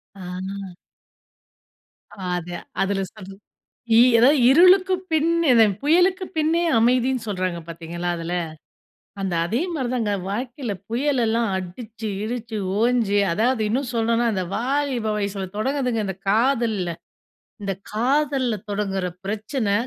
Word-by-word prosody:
அ. 190 0 -6 1.6
அது 175 0 -5 0.3
அதில 195 0 0
சொல் 195 -3 -11 0.7
இ - - +8 0.2
அதாவது 275 +6 +6
இருளுக்கு 370 +5 +6 0.2
பின் 320 +1 +2 0.2
அந்த 225 -1 +7 0.2
புயலுக்கு 360 +5 +3
பின்னே 320 +2 +2 0.2
அமைதின்னு 250 +1 +2
சொல்றாங்க 185 -3 -2
பார்த்தீங்களா! 170 +1 -5
அதில, 165 +1 -4 0.9
அந்த 190 -2 -2
அதே 230 - -1
மாதிரிதாங்க 245 -7 -1 0.2
வாழ்க்கையில 245 +1 -3 0.2
புயல் 265 +2 +1
எல்லாம் 230 +1 +1
அடிச்சு, 215 +4 -6
கிடுச்சு, 225 0 -4 0.2
ஓஞ்சு 230 -4 +2 0.2
அதாவது 230 +4 +1
இன்னும் 255 +2 -1
சொல்லணும்னா 230 +1 +2
அந்த 185 -1 -1
வாலிப 265 -2 -1
வயசில 200 -2 -3
தொடங்குதுங்க 250 -1 0
இந்த 190 0 -4
காதல்ல. 225 -5 +1 0.7
இந்த 195 -1 -1 0.2
காதல்ல 260 0 +1 0.2
தொடங்குற 195 -2 -1 0.2
பிரச்சனை, 215 +1 -2
230 Hz, 110 wpm, -23 LUFS, 195-265 Hz, 1.6 s, இ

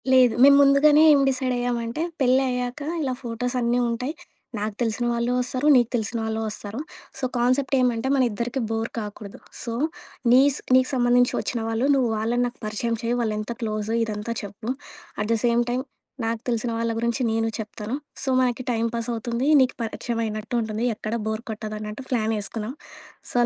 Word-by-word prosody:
లేదు. 255 -3 +6
మేం 280 +1 +9
ముందుగానే 285 +2 +6
ఏం 285 - +5
డిసైడయ్యామంటే, 245 -1 -1 0.2
పెళ్లయ్యాక 255 0 +1 0.2
ఇలా 265 -3 -1
ఫోటోస్ 245 +2 -3
అన్నీ 240 0 +1
ఉంటాయి. 250 +5 -2 0.5
నాకు 210 0 -3
తెలిసిన 235 +1 0
వాళ్ళు 235 +1 0
వస్తారు. 255 +3 -1
నీకు 240 -2 +4
తెలిసిన 225 0 -2
వాళ్ళు 220 0 -2
వస్తారు. 210 +2 -5 0.4
సో, - - -8
కాన్సెప్ట్ 255 +3 +1
ఏమంటే, 245 0 +1
మనిద్దరికీ 245 0 0
బోర్ 225 0 -1
కాకూడదు. 210 -1 -8 0.2
సో, 230 - -3 0.6
నీస్ 270 +2 +5 0.2
నీకు 255 0 +4
సంబంధించి 245 -1 +3
వచ్చిన 240 - -2
వాళ్ళు 225 +3 0
నువ్వు 255 -3 +2
వాళ్ళని 235 +3 +1
నాకు 245 - -10
పరిచయం 225 +2 -1
చెయ్య, 235 +1 0
వాళ్ళెంత 215 0 -2
క్లోజ్ 215 -1 -2
ఇదంతా 215 +1 -3
చెప్పు. 205 +3 -7 0.5
అట్ 210 +1 -1
ద - - +2
సేమ్ 235 0 +3
టైమ్ 250 +2 -1 0.4
నాకు 225 0 -2
తెలిసిన 235 -1 0
వాళ్ళ 230 0 0
గురించి 235 +3 -1
నేను 225 0 +1
చెప్తాను. 215 +2 -5 0.3
సో, - - -5
మనకి 250 0 0
టై‌మ్ 230 0 0
పాస్ 230 +1 -3
అవుతుంది. 235 +3 -2
నీకు 260 0 +2
పరిచయమైనట్టు 225 -1 -3
ఉంటుంది 220 +1 -2
ఎక్కడా 220 +2 -3
బోర్ 220 +1 -2
కొట్టదు 215 0 -5
అన్నట్టు 210 +5 -6
ప్లానేసుకున్నాం. 220 -1 -2 0.6
సో, - - -8
235 Hz, 160 wpm, -24 LUFS, 220-250 Hz, 0.6 s, మేం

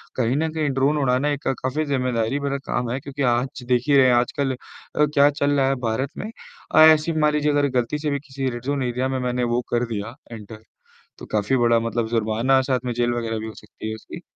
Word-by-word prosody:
कहीं 125 +1 +1
न 160 +1 0
कहीं 155 -2 0
ड्रोन 145 +3 +2
उड़ाना 130 +3 +1
एक 145 -1 -3 0.2
काफ़ी 150 +4 -1
ज़िम्मेदारी 125 -2 0
भरा 140 0 -2
काम 120 -1 -1
है 130 - -2
क्योंकि 140 0 -7
आज 125 +1 -4
देख 125 -1 +2
ही 140 - +5
रहे 130 - +6
हैं, 125 - +4
आजकल 130 +2 0
अ, 150 +3 -3
क्या 145 -1 +4
चल 145 0 -1
रहा 135 -2 +2
है 135 - +1
भारत 130 +5 -1
में। 215 - -5 0.5
अ, - - +7
ऐसे 155 +1 +6
मान 150 0 +3
लीजिए 150 0 +1
अगर 145 0 +2
गलती 120 +5 -2
से 150 0 -2
भी 140 - -1
किसी 135 -1 -3
रेड 120 0 -6
ज़ोन 140 -1 -1
एरिया 125 +1 -1
में 130 - -1
मैंने 125 0 -1
वो 125 - +1
कर 120 0 +1
दिया, 105 +4 -5 0.2
एंटर 110 -1 -10 0.6
तो - - -10
काफ़ी 105 +4 +1
बड़ा 120 -1 +3
मतलब 115 0 -2
जुर्माना, 115 +4 +2
साथ 130 -1 0
में 120 - -1
जेल 120 0 0
वगैरह 115 -2 -2
भी 110 - -5
हो 110 - -7
सकती 110 - -9
है 110 - -4
उसकी। 110 - -10
130 Hz, 240 wpm, -23 LUFS, 120-140 Hz, 0.6 s, अ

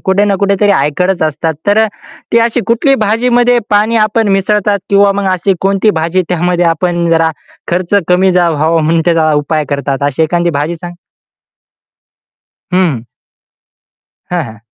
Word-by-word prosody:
कुठे 190 +2 +2
ना 200 -1 +1
कुठेतरी 200 +1 +2
ऐकतच 180 +2 0
असतात. 160 +1 -1
तर 205 +2 +3 0.5
ती 235 - +4
अशी 230 +1 +1
कुठली 240 +4 +2
भाजीमध्ये 240 +3 +2
पाणी 215 +3 +2
आपण 220 0 -1
मिसळतात 205 +1 0
किंवा 200 0 +4
मग 200 -1 -1
अशी 185 +2 0
कोणती 195 +2 +1
भाजी 170 +3 0
त्यामध्ये 175 0 0
आपण 170 +1 0
जरा 165 -1 +2 0.4
खर्च 175 +2 -1
कमी 185 +1 +3
झा 180 -1 +2
व्हावा 160 +2 +1
म्हणून 165 +1 +1
त्याचा 160 -2 +2
उपाय 155 0 -1
करतात. 140 -1 -3
अशी 145 +2 0
एखादी 170 +2 0
भाजी 155 +4 -2
सांग 175 +1 -9 1.8
हं. 155 -11 0 1.3
हां, 175 -2 -1
हां. 110 -4 -11
180 Hz, 145 wpm, -12 LUFS, 160-200 Hz, 1.8 s, ती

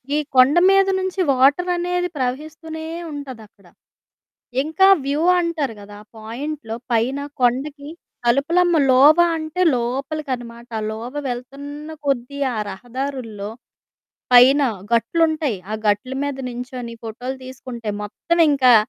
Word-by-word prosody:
ఈ - - +2 0.2
కొండ 255 +3 +6
మీద 390 0 +5
నుంచి 375 +1 -3
వాటరనేది 355 +6 +2
ప్రవహిస్తూనే 310 +5 -4 0.3
ఉంటదక్కడ. 225 -9 -10 1.0
ఇంకా 320 +6 +3 0.2
వ్యూ 285 +3 0 0.2
అంటారు 315 -8 -2
గదా! 205 0 -11
ఆ 215 - -23
పాయింట్‌లో 230 +2 -6 0.2
పైన 235 +5 +1 0.2
కొండకి 280 +4 0 0.4
తలుపులమ్మలోవ 290 +1 +4 0.2
అంటే 315 +3 -2
లోపలికనమాట. 245 -1 -4 0.2
లోవ 230 +4 -6 0.2
వెళ్తన్న 280 +5 -7 0.2
కొద్దీ 275 +1 -1 0.2
ఆ - - -4
రహదారుల్లో 240 -1 -5 0.8
పైన 260 +4 +7 0.3
గట్లుంటయి. 310 - +1
ఆ - - -1
గట్లు 210 +6 0
మీద 285 -1 -3
నించొని 245 -1 -6
ఫోటోలు 245 +4 -5
తీసుకుంటే, 245 -3 -8
మొత్తవింకా 280 +2 +3
265 Hz, 100 wpm, -21 LUFS, 240-305 Hz, 1.0 s, పైన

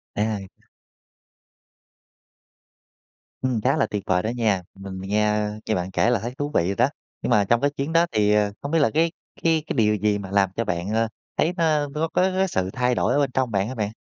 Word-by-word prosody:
À. 105 -2 -1 2.9
Ừm, 125 -4 0
khá - - +2
là 110 - +3
tuyệt 105 -2 -4
vời 90 -1 +1
đó 110 - -1
nha, 110 -6 +1
mình 95 -1 -8
mình 95 +1 -7
nghe, 105 +1 +2
ơ, 105 0 -2
nghe 110 - 0
bạn 90 +1 -3
kể 115 - +2
là 120 - +2
thấy 120 +5 -5
thú 145 +1 -2
vị 85 - +3
rồi 100 - -1
đó, - - +3 0.3
nhưng - - -2
mà 105 - +4
trong 120 +3 +2
cái 145 - +3
chuyến 145 +3 -4
đó 170 +1 +5
thì, 105 -1 +2
à, 105 -1 +2
không 140 - -5
biết 165 - +3
là 145 - +4
cái 165 +1 +2 0.3
cái 160 -2 +3
cái - - -2
điều 105 -3 +3
gì 105 0 +1
mà 95 -1 -7
làm 100 -2 +3
cho 115 - -1
bạn, 90 +1 -2
ơ, 115 +1 +1 0.3
thấy 170 +3 +2
nó, 165 - +1
ơ, 150 -2 +2
nó 155 - -3
có 165 - +2 0.3
có 190 - +3
sự 95 - -1
thay 125 -1 +1
đổi - - +1
ở 145 - +2
bên 140 -3 +1
trong 130 -3 0
bạn 100 +1 +1
hả 130 - -5
bạn? 105 -2 -2
110 Hz, 245 wpm, -24 LUFS, 100-140 Hz, 2.9 s, đó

